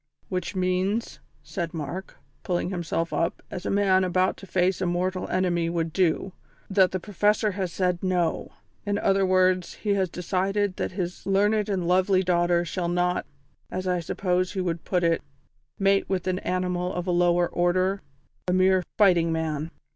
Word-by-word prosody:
"Which 185 +1 -3
means," 185 +4 -1 0.2
said 170 -3 -4
Mark, 165 +5 -6 0.2
pulling 180 0 -1
himself 170 -2 -2
up, 165 - -1
as 180 - -5
a - - 0
man 195 -2 +3
about 185 +1 +1
to 195 - -12
face 185 0 +1
a 185 - +1
mortal 180 +1 -1
enemy 175 -2 0
would 165 -2 -2
do, 185 +1 +1 0.4
"that 190 -2 +5
the 185 - -3
Professor 210 +2 +1
has 185 -2 -3
said 180 -1 0
'No.' 180 -3 0 0.3
In 205 0 -1
other 195 -2 +2
words, 185 -1 +2
he 205 -2 -1
has 190 -2 +1
decided 190 +3 -1
that - - -3
his 180 -1 -4
learned 205 +2 +2
and 185 -4 -1
lovely 185 +1 +3
daughter 175 -1 +2
shall 175 0 -2
not, 180 0 0 0.4
as 185 +1 -4
I 180 -1 +1
suppose 180 +2 -1
he 195 - -3
would 170 -3 -2
put 180 -2 0
it, 165 -1 +2 0.6
mate 195 0 +2
with 190 -3 -1
an 185 0 0
animal 180 0 -1
of 180 -1 -3
a 180 - 0
lower 175 0 +3
order 185 +3 +1 0.5
a 180 - +1
mere 185 0 +4 0.2
fighting 175 -5 +4
man. 160 -1 -2
185 Hz, 170 wpm, -26 LUFS, 175-190 Hz, 0.6 s, that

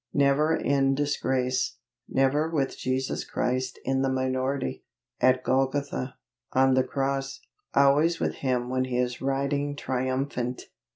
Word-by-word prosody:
Never 145 +3 +3
in 135 -1 +2
disgrace; 130 -4 0 0.3
never 140 +4 +2
with 145 -5 -1
Jesus 130 +1 -2
Christ 130 0 -2
in 135 0 +1
the 135 - +1
minority, 130 - -1 0.4
at 130 0 +3
Golgotha 135 0 0 0.4
on 130 0 +4
the 130 0 +4
cross. 135 0 -2 0.4
Always 150 +5 +4
with - - -1
Him 125 -2 0
when 130 0 0
He 125 -1 -2
is 125 0 -1
riding 140 +2 0
triumphant! 130 -2 -2
135 Hz, 125 wpm, -27 LUFS, 130-140 Hz, 0.4 s, on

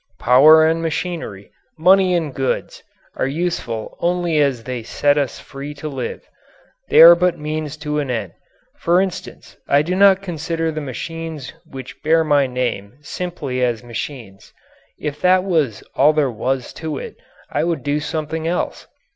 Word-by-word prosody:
Power 150 +6 +6
and 165 +1 +1
machinery, 165 - -4 0.3
money 185 +2 +4
and 160 -5 -2
goods, 135 0 -2 0.3
are - - -1
useful 135 -8 -3
only 175 -2 0
as 135 -5 +1
they 125 0 -4
set 145 +5 +1
us 140 -4 -1
free 140 +2 -8
to 150 +2 -6
live. 135 -4 -5 0.6
They - - +7
are 170 +1 +11
but 175 0 +1
means 155 0 -4
to 150 0 -1
an 140 -3 -3
end. 110 -8 -3 0.4
For 175 +2 +2
instance, 190 -1 -5
I 140 +1 +4
do 175 +4 -2
not 195 0 +5
consider 165 -2 -2
the 155 0 -4
machines 155 +1 -6 0.2
which 130 -2 -10
bear 160 +1 +3
my 145 -3 +3
name 125 -3 -3
simply 145 -5 -4
as 120 -2 -1
machines. 120 -4 -7 0.5
If 150 -1 -5
that 185 0 +4
was 155 - 0
all 150 +3 +4
there 150 -4 +1
was 125 +3 -3
to 155 -3 -3
it - - -8 0.3
I - - 0
would 170 -1 -1
do 145 +1 0
something 155 +1 -3
else. 175 +1 -3
150 Hz, 160 wpm, -20 LUFS, 130-165 Hz, 0.6 s, are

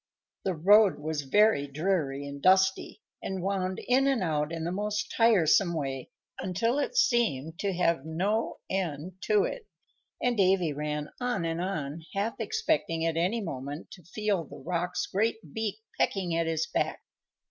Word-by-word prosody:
The 190 -2 0
road 200 +4 +5
was 150 0 -3
very 145 0 +3
dreary 145 -2 -1
and 140 0 -7
dusty, 190 +3 +3 0.2
and 190 -2 -4
wound 190 -1 -1
in 265 +2 +4
and 265 -7 +2
out 150 -2 0
in 165 -1 -4
the 170 - -2
most 205 +1 -2
tiresome 195 -6 +4
way 135 -4 -3 0.3
until 230 +9 0
it 390 - -2
seemed 170 - +2
to 200 - 0
have 170 -5 +1
no 190 +8 -1
end 180 -1 -3
to 210 -2 +4
it, - - -4 0.5
and 245 -1 +1
Davy 185 -5 +3
ran 150 0 -3
on 245 -8 -1
and 165 +1 -2
on, 160 -4 -3
half 205 +3 0
expecting 315 - 0
at 165 -1 0
any 185 +8 +1
moment 145 -3 -6
to 180 - -11
feel 200 +1 -1
the - - -11
Roc's 175 0 -2
great 220 +4 0 0.2
beak 220 -3 -2 0.2
pecking 180 -4 +1
at 165 0 +1
his 160 -1 0
back. - - -2
185 Hz, 160 wpm, -29 LUFS, 160-210 Hz, 0.5 s, road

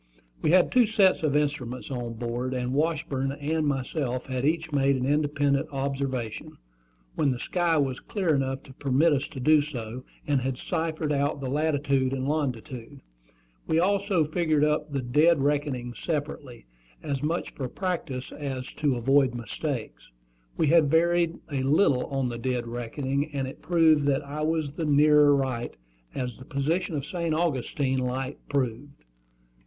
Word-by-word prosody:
We - - +1
had 180 +2 +5
two 245 -3 +5
sets 205 -4 +3
of 150 -3 +1
instruments 140 -4 -1
on 120 -3 -4
board; 120 +2 -3
and 125 0 -2
Washburn 140 -3 0
and 150 +2 -1
myself 130 -2 -2
had 130 0 -2
each 160 +1 0
made 140 -1 +3
an 130 -1 -1
independent 145 -1 +1
observation, 135 -4 -3 0.6
when 150 - +1
the 125 - -1
sky 170 +4 +1
was 135 -3 0
clear 185 -6 -1
enough 135 -1 -1
to 130 - -13
permit 140 +4 +2
us 145 0 0
to 160 -5 -9
do 150 +3 +5
so, 125 -4 -6 0.2
and 140 -3 +1
had 130 0 -2
ciphered 160 0 -2
out 140 +1 0
the 130 -2 -4
latitude 140 -3 +1
and 135 0 -2
longitude. 135 -2 -3 0.7
We - - +1
had 165 - +4
also 195 -3 +2
figured 155 -1 +1
up 150 0 +1
the 135 -2 -2
dead 150 +4 +3
reckoning 140 -4 -1
separately, 145 - -4 0.4
as 140 -2 -2
much 160 +4 -1
for 130 - -4
practice 165 -9 -3
as 135 -3 -5
to 145 -4 +1
avoid 130 +1 +3
mistakes. 120 - -5 0.5
We - - +2
had 155 -1 +5
varied 170 +1 +2
a 135 -2 -1
little 135 -1 +3
on 135 -2 -1
the 120 -1 -5
dead 125 -1 -1
reckoning, 130 +5 -2
and 135 -1 -1
it 130 - -9
proved 160 -3 +4
that 140 +1 +1
I 145 +2 -5
was 155 -2 0
the 160 +2 -4
nearer 150 0 +5
right, 130 -3 -2 0.4
as 125 -3 -3
the 130 - -11
position 155 +5 -1
of 140 -1 -3
St. 165 0 -2
Augustine 140 -4 0
Light 130 +2 -3
proved. 140 - -3
140 Hz, 165 wpm, -27 LUFS, 130-155 Hz, 0.7 s, had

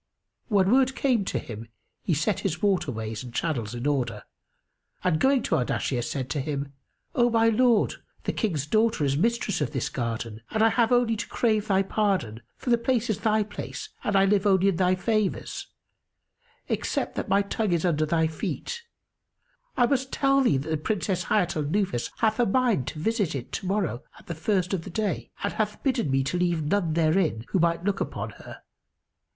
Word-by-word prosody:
When 200 -3 +3
word 265 +1 +4
came 250 -7 +2
to - - -1
him, 115 0 -7 0.3
he 170 - 0
set 180 +6 0
his 175 -4 -2
water 195 -9 +1
ways 110 0 -5
and 125 - -8
channels 120 -6 -2
in 120 +2 -5
order 120 -7 -1 0.8
and, 175 -4 +2
going 265 - +3
to - - +1
Ardashir, 125 0 -1
said 125 +2 -3
to 145 - -1
him, 140 0 -4 0.4
"O 240 -1 +3
my 230 -1 +4
lord, 230 -1 +2 0.2
the - - -1
King's 165 - -1
daughter 215 0 +2
is 135 0 +1
mistress 225 +2 0
of 145 0 -1
this 135 - -1
garden; 115 -2 -4
and 220 0 +1
I 225 - +6
have 230 0 +2
only 245 -2 +3
to 230 - -4
crave 215 -3 +1
thy 195 -1 +3
pardon, 190 - 0 0.2
for 250 - -3
the 235 - +4
place 235 -1 +1
is 205 - -2
thy 215 -1 +2
place 205 0 -7
and 205 - 0
I 195 0 +5
live 200 0 +2
only 195 0 +4
in 185 - -1
thy 185 0 +3
favours, 215 +1 -1 1.0
except - - -1
that - - -4
my 200 +1 +4
tongue 205 0 -1
is 170 0 +1
under 155 -3 +1
thy 160 +1 +2
feet.[FN#282] 160 - -4 1.0
I 245 - +5
must 265 +1 0
tell 275 0 +3
thee 195 - +3
that 140 +4 -4
the 160 - +1
Princess 180 +1 -1
Hayat 180 -4 +1
al 155 - 0
Nufus 155 - 0
hath 220 +1 +1
a 240 - +4
mind 230 - +2
to - - -5
visit 205 -1 0
it 130 -1 -6
to 185 - -4
morrow 190 - -1 0.2
at - - -17
the 170 - -4
first 185 +3 0
of 175 -4 -1
the - - -8
day 205 +1 -2
and 200 - -1
hath 210 -1 -2
bidden 260 - +1
me 135 0 +2
leave 175 -3 +1
none 165 +1 +1
therein 160 - +1
who 190 - +1
might 170 0 +1
look 200 0 0
upon - - -3
her. - - -12
190 Hz, 200 wpm, -26 LUFS, 150-220 Hz, 1.0 s, I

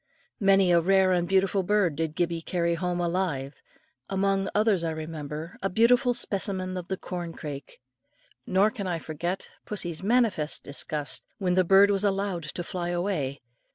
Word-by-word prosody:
Many 195 -3 +4
a 170 -1 +5
rare 190 +1 +4
and 175 -1 +1
beautiful 195 0 +3
bird 190 -4 +2
did 160 0 -2
Gibbie 170 -1 0
carry 170 0 0
home 175 +1 -2
alive, 170 -6 -2 0.5
among 195 0 +1
others, 210 -4 +3
I 165 - 0
remember, 155 0 -6
a 195 - 0
beautiful 240 +4 +4
specimen 190 -5 -2
of 180 -1 -5
the 190 - -2
corn 175 -2 -5
crake; 145 -3 -8 0.7
nor 195 +3 +3
can 205 -5 -5
I 175 -2 -1
forget 165 +4 -4
pussie's 175 -6 -4
manifest 210 -8 +1
disgust, 145 0 -3
when 185 -3 0
the 185 +1 +4
bird 195 +3 +6
was 200 0 +1
allowed 195 -3 0
to 175 +3 -5
fly 175 0 -4
away. 175 -7 -2
180 Hz, 160 wpm, -27 LUFS, 165-195 Hz, 0.7 s, bird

